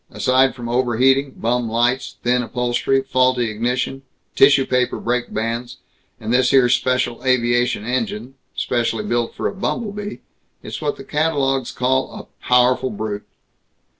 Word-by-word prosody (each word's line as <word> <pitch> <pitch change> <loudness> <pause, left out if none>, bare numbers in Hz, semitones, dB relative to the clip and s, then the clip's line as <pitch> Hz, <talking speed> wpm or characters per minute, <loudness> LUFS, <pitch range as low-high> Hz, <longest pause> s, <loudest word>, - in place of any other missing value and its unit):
Aside 130 +1 +2
from 120 -2 -7
overheating, 130 +3 +2
bum 120 0 -1
lights, 120 +3 0
thin 125 +1 +2
upholstery, 125 +3 0
faulty 130 -3 +1
ignition, 125 +4 -2 0.3
tissue 135 -1 +5
paper 125 -1 0
brake 120 +1 -2
bands, 115 +2 -3 0.4
and 110 +2 -3
this 125 0 +3
here 130 -2 +5
special 125 -1 0
aviation 120 -3 +1
engine, 120 0 -3 0.2
specially 115 -3 -1
built 120 +2 -1
for - - -2
a - - -4
bumble 205 +2 -3
bee, 205 0 -7 0.4
it's - - -7
what 150 -1 -1
the - - -9
catalogues 135 -3 0
call 130 +1 0
a - - -13
powerful 125 +1 +3
brute!" 105 -2 -5
125 Hz, 140 wpm, -20 LUFS, 120-130 Hz, 0.4 s, tissue